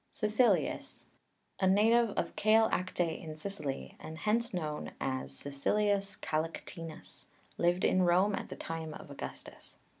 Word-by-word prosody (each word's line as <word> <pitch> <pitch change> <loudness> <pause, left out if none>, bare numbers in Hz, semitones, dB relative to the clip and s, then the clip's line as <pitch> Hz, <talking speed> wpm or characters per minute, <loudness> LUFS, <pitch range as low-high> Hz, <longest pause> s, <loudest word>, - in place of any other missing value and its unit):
CAECILIUS, 220 +3 +1 0.5
a 190 - +3
native 225 +4 +5
of - - -1
Kale 220 +1 +5
Akte 180 -2 -1
in 155 -1 -6
Sicily, 155 -5 -4
and 160 0 -8
hence 230 +6 +1
known 155 -5 -3
as 70 - -3
Caecilius 200 +8 +1
Kalaktinus, 165 +1 -5 0.3
lived 175 +1 +3
in 185 - +4
Rome 185 +3 +4
at - - -3
the - - -6
time 160 -1 -5
of - - -10
Augustus. 140 - -8
180 Hz, 130 wpm, -32 LUFS, 155-210 Hz, 0.5 s, native